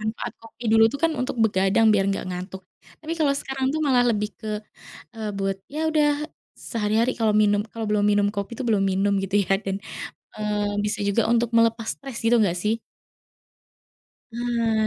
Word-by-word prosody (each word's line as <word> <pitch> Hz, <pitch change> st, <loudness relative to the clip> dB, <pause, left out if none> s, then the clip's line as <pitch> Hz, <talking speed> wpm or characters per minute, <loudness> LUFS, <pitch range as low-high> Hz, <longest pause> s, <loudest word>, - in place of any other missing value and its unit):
manfaat 220 Hz, +1 st, -4 dB
kopi 225 Hz, +1 st, -14 dB
dulu 225 Hz, 0 st, +7 dB
tuh 280 Hz, -, -5 dB
kan 330 Hz, -, +3 dB
untuk 255 Hz, -, -2 dB
begadang 195 Hz, +1 st, +3 dB
biar 195 Hz, -2 st, +3 dB
enggak 195 Hz, -, -1 dB
ngantuk, 185 Hz, +1 st, -6 dB, 0.4 s
tapi 315 Hz, +1 st, -5 dB
kalau 285 Hz, -3 st, +3 dB
sekarang 270 Hz, -1 st, -3 dB
tuh 310 Hz, -, -1 dB
malah 250 Hz, -3 st, +4 dB
lebih 210 Hz, -1 st, 0 dB
ke, 220 Hz, -, -6 dB, 0.7 s
eee, 215 Hz, -1 st, -3 dB
buat 195 Hz, 0 st, -1 dB
ya 300 Hz, -, -7 dB
udah 300 Hz, 0 st, +1 dB, 0.2 s
sehari-hari 225 Hz, +2 st, 0 dB
kalau 220 Hz, -2 st, +2 dB
minum, 205 Hz, -1 st, +3 dB
kalau 225 Hz, -1 st, -4 dB
belum 210 Hz, -1 st, +2 dB
minum 205 Hz, 0 st, +3 dB
kopi 200 Hz, +2 st, -4 dB
tuh 255 Hz, -, -5 dB
belum 200 Hz, -3 st, +2 dB
minum 195 Hz, +1 st, +1 dB
gitu 195 Hz, +1 st, -2 dB
ya, 195 Hz, -, +4 dB
dan, 195 Hz, 0 st, -3 dB, 0.5 s
eee, 210 Hz, -1 st, -1 dB
bisa 210 Hz, +1 st, -2 dB
juga 210 Hz, +3 st, +1 dB
untuk 235 Hz, 0 st, +1 dB
melepas 230 Hz, 0 st, +3 dB
stres 270 Hz, -4 st, -9 dB
gitu 230 Hz, 0 st, +4 dB
enggak 180 Hz, -4 st, +1 dB
sih? 215 Hz, +5 st, -1 dB, 1.5 s
Nah 230 Hz, -2 st, 0 dB
220 Hz, 180 wpm, -24 LUFS, 205-235 Hz, 1.5 s, dulu